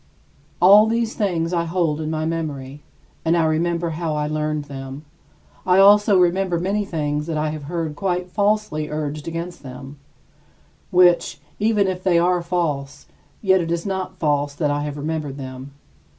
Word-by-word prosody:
All 200 +4 +7
these 230 0 0
things 175 -5 -1
I 170 -1 +1
hold 165 -3 0
in 155 - -3
my 155 0 -2
memory, 150 -4 -4 0.4
and 165 +1 +2
I 165 - +3
remember 170 +1 0
how 160 -1 -2
I 150 0 -1
learned 150 0 -2
them. 135 +1 -8 0.6
I 185 0 +3
also 205 +1 +6
remember 180 0 +2
many 200 +4 -1
things 150 -4 -2
that 160 -2 -2
I 155 0 0
have 155 -2 -7
heard 165 -1 -3
quite 180 -1 -2
falsely 205 -7 0
urged 150 0 -4
against 170 +2 -5
them, 135 +1 -10 0.9
which, 180 -4 +3 0.2
even 210 -1 +2
if 185 -1 -3
they 180 -2 +2
are 175 +1 +2
false, 165 -6 -2 0.4
yet 190 -2 +4
it 165 0 -3
is 170 0 -2
not 190 -1 -3
false 145 -3 0
that 145 -1 0
I 145 0 -1
have 145 0 -5
remembered 150 -2 -3
them. 130 0 -8
165 Hz, 165 wpm, -21 LUFS, 150-180 Hz, 0.9 s, All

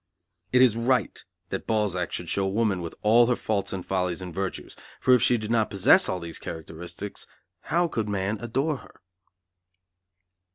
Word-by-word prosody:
It 125 0 +6
is 120 -4 +4
right 125 +2 0 0.3
that - - -5
Balzac 100 -5 0
should 90 - -4
show 95 +3 0
woman 100 -2 0
with 85 -1 -6
all 115 +3 +6
her 125 - +2
faults 105 -4 -2
and 95 -2 -5
follies 90 -2 -1
and 90 -2 -7
virtues, 95 +1 -4 0.2
for 130 - +4
if 125 - +5
she 120 0 +4
did 110 0 -5
not 115 -2 +2
possess 100 -2 +5
all 90 - -1
these 85 -1 -6
characteristics, 85 +4 -7 0.4
how 175 +1 +2
could 110 -9 -3
man 100 +1 -1
adore 135 +6 -1
her? - - -17
105 Hz, 170 wpm, -26 LUFS, 90-120 Hz, 0.4 s, It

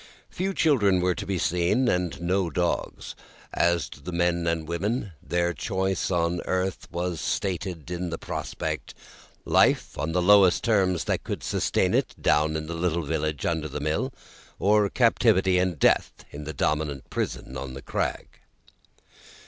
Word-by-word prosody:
Few 190 +2 -2
children 105 - +3
were 90 0 +2
to 85 - -6
be 95 -1 -1
seen, 90 +9 +1
and 90 -5 0
no 90 +1 0
dogs. 85 0 -2 0.4
As 85 -2 +2
to - - -12
the 90 - -6
men 85 0 +1
and 80 -2 -1
women, 100 +5 -2
their 85 0 0
choice 95 +1 -1
on 85 -1 0
earth 95 0 -2
was 85 -1 -3
stated 90 -3 -3
in 90 0 -3
the 80 - -4
prospect - - -5 0.5
Life - - +2
on 80 - -1
the 90 - +1
lowest 95 -1 +6
terms 95 -7 +2
that - - -1
could - - -5
sustain - - +1
it, - - 0
down 75 +1 +2
in 80 0 -3
the 85 - -5
little 85 0 -1
village 75 -1 -2
under 80 -2 -1
the 75 0 -5
mill; 80 - -1 0.5
or 105 0 +3
captivity 95 -6 +3
and 90 -3 0
Death - - +2
in 75 0 -8
the 80 - -5
dominant 75 -2 -2
prison 65 - -3
on 65 -1 -6
the 70 - -7
crag. - - -3
85 Hz, 160 wpm, -26 LUFS, 80-95 Hz, 0.5 s, lowest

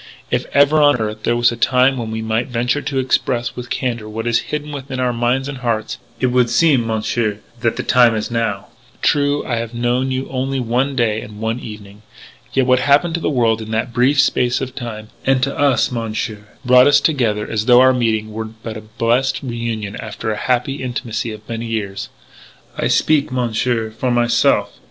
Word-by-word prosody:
"If - - 0
ever 145 +2 +4
on 145 -1 +5
earth 110 -1 -4
there 120 - +1
was 120 0 +3
a - - -4
time 125 +3 +3
when 115 -3 -4
we 110 0 -4
might 110 +3 -1
venture 125 +3 -1
to 140 -1 -3
express 130 -2 0
with 120 0 -7
candour 120 -4 -3
what 110 +1 -5
is 120 -1 +2
hidden 150 0 -4
within 135 -2 -6
our 125 -1 +1
minds 120 +3 0
and 140 -3 -6
hearts, 115 -3 -2 0.2
it - - +1
would 125 -1 +3
seem, 120 -1 +3
Monsieur, 110 -1 -1 0.2
that 115 -1 0
the - - -3
time 120 -2 +4
is 110 +2 -3
now. 115 -4 -1 0.4
"True, 145 0 +2
I 120 - -1
have 115 0 -4
known 120 +2 0
you 130 0 -2
only 135 +1 -2
for 130 - -1
one 130 +4 0
day 110 -3 +1
and 105 0 -10
one 110 +2 -2
evening. 105 -2 -10 0.5
Yet, 135 -1 +2
what 130 0 +4
happened 145 +6 +3
to 170 - -1
the - - -1
world 115 -5 +1
in 110 - -8
that 115 +2 -1
brief 130 +4 +3
space 125 -2 +2
of 130 -1 -5
time 110 -4 -7
and 135 -1 +2
to 135 +1 -1
us, 140 -5 +2
Monsieur 110 -2 -4 0.2
brought 125 +1 +6
us 145 - +6
together 115 -9 0
as 110 -1 -2
though 125 0 +7
our 130 0 +6
meeting 110 -3 -1
were 110 +1 -4
but 110 0 -8
a - - -8
blessed 120 +5 0
reunion 115 -4 -4
after 110 0 -5
the - - -1
happy 130 +4 -1
intimacy 120 -3 -3
of 110 0 -11
many 115 0 -4
years.... 100 -3 -4 0.7
I - - -1
speak, 150 -4 +2
Monsieur, 120 -2 -1
for 120 +3 -2
myself. 120 -3 +2
120 Hz, 205 wpm, -18 LUFS, 110-130 Hz, 0.7 s, though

